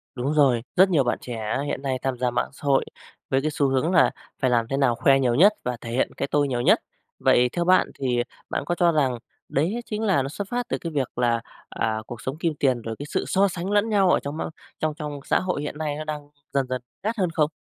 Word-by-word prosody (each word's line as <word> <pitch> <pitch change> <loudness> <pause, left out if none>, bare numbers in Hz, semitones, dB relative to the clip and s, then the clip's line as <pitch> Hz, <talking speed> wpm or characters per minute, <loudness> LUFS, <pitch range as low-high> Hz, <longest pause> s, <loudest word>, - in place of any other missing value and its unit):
Đúng 135 +4 -1
rồi, 135 -6 +4
rất 190 +1 +6
nhiều 155 -7 +3
bạn 120 - 0
trẻ 110 -3 -3
hiện 140 - -3
nay 135 -2 -1
tham 135 -2 -1
gia 125 0 0
mạng 120 - -1
xã - - -16
hội, 135 -1 +3 0.4
với 135 0 +2
cái 155 +2 -1
xu 145 -1 +1
hướng 135 +6 +1
là 180 - +5 0.3
phải 130 - +3
làm 115 -2 +2
thế 135 +3 -1
nào 130 -4 +3
khoe 135 +3 +4
nhiều 125 -3 +2
nhất, 200 - +6
và 125 -1 -2
thể 115 - -6
hiện 125 - +1
cái - - -1
tôi 145 -1 +3
nhiều 125 -3 -1
nhất. - - +5 0.4
Vậy 125 0 +4
theo 170 0 -1
bạn 185 +1 +5
thì 125 -2 +1 0.3
bạn - - -2
có 175 - -1
cho 175 -1 +4
rằng 135 -6 +1 0.3
đấy 180 - 0
chính 215 0 -4
là 195 -10 +3
nó 135 - -4
xuất 200 +7 -5
phát 245 0 -2
từ - - 0
cái 165 - -5
việc 140 -6 -2
là, 120 -1 +2 0.3
à, 110 -1 -1
cuộc 120 -2 -8
sống 135 +3 -4
kim 165 -1 0
tiền 130 -4 +2
rồi 115 0 -5
cái 145 - -5
sự - - -1
so 195 +1 +3
sánh 185 +1 -4
lẫn 205 +2 +2
nhau 195 -4 +3
ở - - +4
trong 145 +2 -5
mong - - -3 0.3
trong 155 -1 0
trong 150 -1 -5
xã - - +2
hội 180 -5 -2
hiện 150 0 -5
nay 150 -2 -2
nó 155 - -4
đang 150 -1 -6 0.2
dần 135 -2 +1
dần 130 -1 -2 0.2
gắt 225 +3 -1
hơn 185 -4 +1
không? 155 -1 +2
140 Hz, 265 wpm, -24 LUFS, 125-170 Hz, 0.4 s, rất